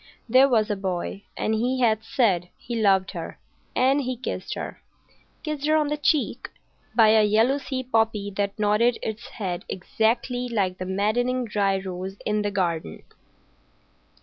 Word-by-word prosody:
There 260 +4 +6
was 220 -3 +2
a - - +1
boy, 190 +1 -4
and 220 - 0
he 250 +4 0
had 220 -2 +2
said 195 -7 +1
he 240 - -6
loved 195 -3 +3
her. - - -7 0.4
And 270 +3 +3
he 255 -1 -3
kissed 255 - -4
her,—kissed 305 -2 -8
her 310 - +4
on 305 -2 +2
the 300 - -1
cheek,—by 250 -6 0
a 220 0 +6
yellow 225 +7 +3
sea 260 -1 -4
poppy 225 -4 0
that 200 0 -1
nodded 215 +3 +2
its 220 0 -4
head 185 -5 -4
exactly 235 +6 -1
like 190 -5 -1
the 185 - -4
maddening 240 +6 0
dry 200 -3 +1
rose 190 +1 -6
in 210 0 +1
the 205 - 0
garden. 170 - -2
220 Hz, 150 wpm, -25 LUFS, 200-250 Hz, 0.4 s, There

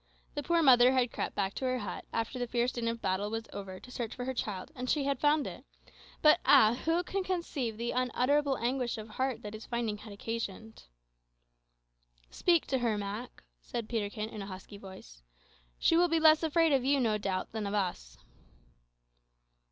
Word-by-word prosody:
The 290 - -3
poor 335 +2 +2
mother 250 -2 +7
had 250 -2 +2
crept - - -4
back 195 -1 -1
to 265 - -4
her 255 0 +1
hut 205 -7 -6
after 230 +3 -2
the 245 - -2
fierce 240 +1 0
din 235 -2 -3
of 230 0 -3
battle 190 +2 0
was 225 +1 -4
over 190 -2 -7
to 250 - -13
search 235 -3 -4
for 245 - -5
her 260 - -2
child, 210 0 -4
and 255 -3 -5
she 295 - +2
had 275 -2 -1
found 295 0 +3
it; - - -7 0.6
but 305 +2 +7
ah, 235 -6 +6
who 330 +2 +2
can 390 +1 -2
conceive 315 - -2
the 235 +1 -2
unutterable 260 +3 +1
anguish 245 0 -1
of 215 0 -8
heart 260 +2 -2
that 210 0 -6
its 215 0 -9
finding 230 -3 -2
had 215 0 -11
occasioned! 220 0 -6 1.5
"Speak 345 -3 +2
to 265 - 0
her, 230 -3 0
Mak," 205 +4 -6 0.2
said 230 - -5
Peterkin, 215 -1 -3
in 215 - -7
a 195 - -6
husky 195 +1 -9
voice; 190 - -12 0.6
"she - - +3
will 350 +1 +5
be 330 -1 +2
less 315 -1 +6
afraid 325 0 +3
of 270 -3 +3
you, 275 +1 +3
no 220 -4 +1
doubt, 190 -2 -2
than 220 -2 -3
of 200 - -2
us." 175 - -3
240 Hz, 195 wpm, -31 LUFS, 210-275 Hz, 1.5 s, mother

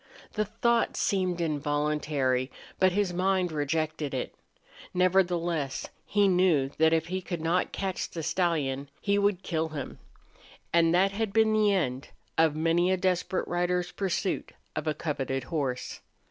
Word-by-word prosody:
The 215 0 0
thought 230 +2 +1
seemed 185 -3 0
involuntary, 145 -4 0 0.3
but 185 0 +5
his 195 -1 0
mind 185 0 +1
rejected 155 -1 -1
it. 125 - -3 0.6
Nevertheless, 175 -5 +1 0.2
he 205 -1 +3
knew 180 -7 +3
that 160 0 +5
if 160 0 +2
he 185 +1 -2
could 175 -2 -4
not 165 +3 0
catch 190 -2 -3
the 165 - -5
stallion 150 -5 0
he 200 0 +1
would 200 -2 +1
kill 160 -2 -1
him. 150 -3 -6 0.7
That 170 +3 +4
had 215 +1 -2
been 220 +1 +3
the 215 -1 +4
end 135 -9 -1 0.3
of 160 -2 +3
many 165 +3 +2
a 190 - +2
desperate 185 0 0
rider's 175 0 0
pursuit 190 0 -2 0.2
of 155 +1 -3
a 155 - +1
coveted 135 -4 -2
horse. 130 -2 -3
170 Hz, 145 wpm, -28 LUFS, 150-190 Hz, 0.7 s, but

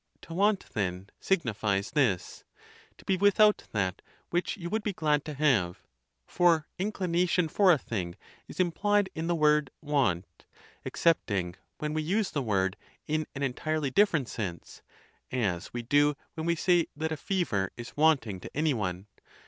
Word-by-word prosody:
To 165 - -10
want, 200 +3 +2
then, 95 -2 -3
signifies 110 - 0
this: 125 - 0 0.5
to - - -18
be 190 - +1
without 205 +2 +4
that 95 -2 -1 0.3
which 175 +1 -1
you 170 -3 -5
would 220 +5 -1
be 210 -1 -2
glad 150 -4 +1
to 150 - -5
have; 120 -12 +1 0.4
for 170 -3 +3
inclination 180 -3 +1
for 190 +4 +4
a 165 - +5
thing 95 -9 -4 0.3
is*implied 195 +3 +1
in 160 +1 -3
the 175 - +1
word 150 -2 +3
want, 100 - -1 0.4
excepting 100 - +1 0.2
when 150 0 -3
we 155 - 0
use 190 +6 0
the 145 - -1
word 95 -5 0 0.3
in 155 +1 -1
an 140 - -3
entirely 145 +2 -1
different 160 - +3
sense, 90 -6 -6 0.5
as 100 -8 -1
we 120 0 -4
do 145 +3 +3 0.2
when 160 0 -4
we 170 - +2
say 175 0 +3
that 160 +2 -2
a - - 0
fever 140 - -1
is 120 -1 -8
wanting 140 -11 +2
to - - -9
any 155 -1 +2
one. 95 -5 -3
150 Hz, 155 wpm, -29 LUFS, 105-175 Hz, 0.5 s, a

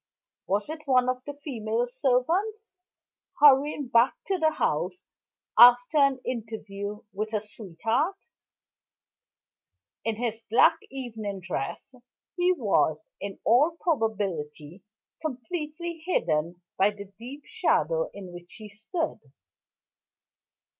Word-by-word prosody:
Was 200 +1 0
it 310 -1 -7
one 255 -2 +4
of 255 0 -2
the 290 - -6
female 240 -5 -2
servants, 325 - 0 0.7
hurrying 290 0 +5
back 240 +1 +4
to 385 -2 -1
the 315 -1 +4
house 365 - -1 0.5
after 245 +5 +8
an 275 -2 +4
interview 210 -3 -5
with 215 +3 -4
a 215 - +2
sweetheart? 225 - -2 1.9
In 225 -1 -1
his 225 0 -3
black 225 - +5
evening 220 -7 -5
dress, 180 - -5 0.4
he 360 0 +3
was, 200 - +1
in 200 -1 -6
all 295 +9 +4
probability, 190 - -2 0.4
completely 315 +4 -4
hidden 170 - -1 0.2
by 195 - +5
the 200 -1 -10
deep 270 +5 -9
shadow - - +1
in 185 -3 -10
which 175 0 -11
he 215 -2 -10
stood. 305 - -3
240 Hz, 110 wpm, -27 LUFS, 205-295 Hz, 1.9 s, after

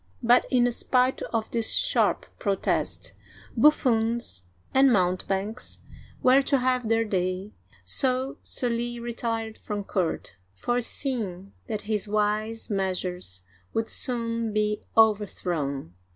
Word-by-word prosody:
" - - -32
But, 240 +1 +5
in 245 -2 +3
spite 255 +2 +1
of 225 -2 -3
this 230 -1 +2
sharp - - +2
protest, 155 - -1 0.4
buffoons 235 - +2 0.3
and 265 0 +6
mountebanks 195 +3 -1 0.4
were 260 +2 +6
to 275 0 +2
have 250 -2 +1
their 225 0 +3
day, 185 0 -2 0.3
so 260 0 +1
Sully 240 -1 -1
retired 230 -2 -3
from 205 -1 -4
court, 175 - -2 0.2
fore 240 - 0
seeing 210 -8 -3
that 215 -2 -3
his 210 -1 -2
wise 215 +2 -1
measures 180 - -3 0.3
would 225 0 0
soon 230 -2 -1
be 210 0 0 0.2
overthrown. 175 - +1
220 Hz, 115 wpm, -26 LUFS, 190-240 Hz, 0.4 s, and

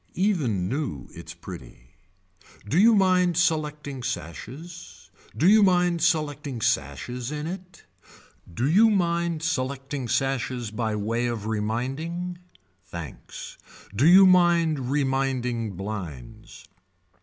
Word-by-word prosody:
Even 145 - 0
new 130 - -3
its - - -10
pretty. - - -11 0.8
Do 155 - +2
you 225 +2 +6
mind 180 -3 +3
selecting 150 -5 -1
sashes. 105 - -7 0.3
Do 160 - +3
you 215 +2 +7
mind 180 -3 +3
selecting 150 -6 0
sashes 110 - -2
in 150 0 -4
it. 180 +1 -8 0.7
Do 120 +10 -1
you 210 +9 +5
mind 170 -4 0
selecting 135 -3 -2
sashes 125 -2 -1
by 110 -1 -2
way 115 +4 -1
of 115 -3 -4
reminding, 135 +12 -3 0.4
thanks. 85 -7 -9 0.4
Do 135 +9 +4
you 190 +3 +9
mind 170 -7 +3
reminding 130 -5 -1
blinds. 90 - -7
140 Hz, 110 wpm, -25 LUFS, 115-170 Hz, 0.8 s, you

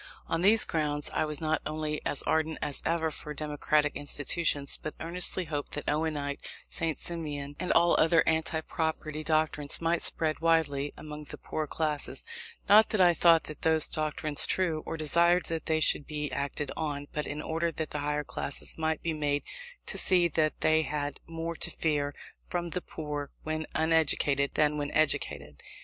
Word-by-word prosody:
On 165 - -1
these 210 +4 +5
grounds 150 -2 -1
I - - 0
was 150 -1 -4
not 155 0 0
only 155 0 -3
as 145 - +1
ardent 160 0 0
as 145 -2 +1
ever 160 -1 0
for 150 0 -7
democratic 150 0 0
institutions, 145 0 -1
but 155 - -5
earnestly 180 +2 -1
hoped 145 -2 -4
that 150 - -4
Owenite, 150 -2 -1 0.3
St. 165 -3 -1
Simonian, 145 -4 -4
and 180 - -1
all 170 0 +5
other 165 +1 +5
anti 160 0 +1
property 155 -1 -3
doctrines 155 -2 0
might 170 +1 0
spread 155 -1 -1
widely 145 -4 +1
among 150 0 -8
the - - -8
poorer 155 -1 -4
classes; 150 - -2 0.4
not 215 +2 +7
that 215 - 0
I 175 -2 +6
thought 165 0 +5 0.2
those 160 -1 +4
doctrines 155 -1 +4
true, 170 -4 0
or 165 - -3
desired 170 +3 +3
that 165 -1 -3
they 160 -1 +2
should 145 -1 +3
be 150 -1 -3
acted 140 0 -3
on, 145 -3 -3
but 150 - -2
in 150 - -5
order 165 +2 -1
that 160 -1 -4
the 150 - -2
higher 150 +1 -1
classes 145 +2 -3
might 160 0 -1
be 165 - -1
made 145 -1 -1 0.4
to - - -3
see 180 -2 +4
that 155 -1 0
they 160 0 +4
had 145 -2 -3
more 165 0 -4
to - - 0
fear 145 -3 -1 0.3
from 175 -1 -3
the 180 - -2
poor 150 -4 -5
when 155 0 -3
uneducated 150 -3 +2
than 150 0 +2
when 145 0 -2
educated. 75 - -1
155 Hz, 175 wpm, -29 LUFS, 145-165 Hz, 0.4 s, not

